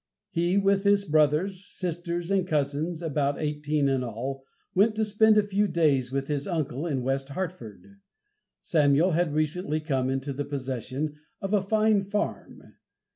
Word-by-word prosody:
He, 175 +3 +1
with 195 0 +3
his 200 0 +3
brothers, 155 +5 +2
sisters 175 -1 -4
and 190 -2 +2
cousins, 155 +2 -1
about 145 -3 0
eighteen 150 -1 0
in 135 -2 +1
all, 130 +4 -5 0.3
went 215 +4 +3
to 220 0 +1
spend 215 +1 +4
a 210 - +5
few 205 +1 +1
days 150 -8 +2
with 135 0 -1
his 145 -2 -2
uncle 155 -4 -2
in 135 -6 -1
West 135 +1 -1
Hartford. 180 - -7 0.6
Samuel 150 +2 +3
had 170 -1 +1
recently 155 0 0
come 135 -5 -1
into 135 +1 -2
the 145 +2 -3
possession 135 +2 -4 0.2
of 195 +1 -3
a 205 - +4
fine 215 0 +2
farm. 205 +2 -4
155 Hz, 155 wpm, -27 LUFS, 140-195 Hz, 0.6 s, a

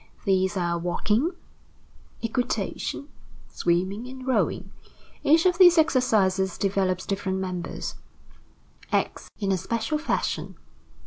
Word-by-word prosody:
These 190 0 +2
are 170 -1 0
walking, 210 - +1 0.9
equitation, 250 +4 -2 0.4
swimming, 185 +7 0
and 260 0 -9
rowing. 260 - 0 0.5
Each 320 +4 +4
of 360 0 +3
these 355 -2 +8
exercises 205 - +2
develops 190 -2 0
different 195 -1 -2
members, 185 -2 -4 1.0
acts - - -1
in 200 -2 -1
a 190 - +2
special 230 - -1
fashion. 315 - -2
200 Hz, 105 wpm, -26 LUFS, 185-260 Hz, 1.0 s, these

